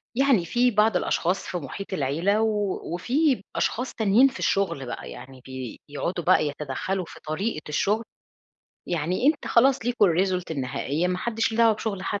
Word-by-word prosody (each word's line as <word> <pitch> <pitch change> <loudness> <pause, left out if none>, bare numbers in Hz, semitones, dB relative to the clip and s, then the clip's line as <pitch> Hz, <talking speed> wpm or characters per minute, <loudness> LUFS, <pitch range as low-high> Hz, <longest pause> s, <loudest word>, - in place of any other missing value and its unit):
يعني 265 -9 +3
في 245 +7 +2
بعض 210 -2 +3
الأشخاص 180 +1 -1
في 180 - -3
محيط 175 +6 -7
العيلة 170 +8 +1
و 210 -3 0
وفيه 260 - +1
أشخاص 250 +3 -1
تانيين 220 +5 +4
في 265 - -6
الشغل 195 -9 0
بقى 120 - -6
يعني 130 - -11 0.5
بيقعدوا 170 +4 -3
بقى 150 - +4
يتدخلوا 150 +6 -3
في - - -12
طريقة 155 +3 -2
الشغل. 210 +9 +1 0.9
يعني 175 - 0
أنت 300 -1 +2
خلاص 260 +3 +4
ليكم 240 -3 +2
الresult 185 0 +1
النهائية، 140 +4 -1
ما 180 0 -1
حدش 225 0 -1
ليه 225 - -4
دعوة 230 -1 +6
بشغل 205 -3 -4
حد. 205 +1 -2
195 Hz, 160 wpm, -25 LUFS, 160-225 Hz, 0.9 s, دعوة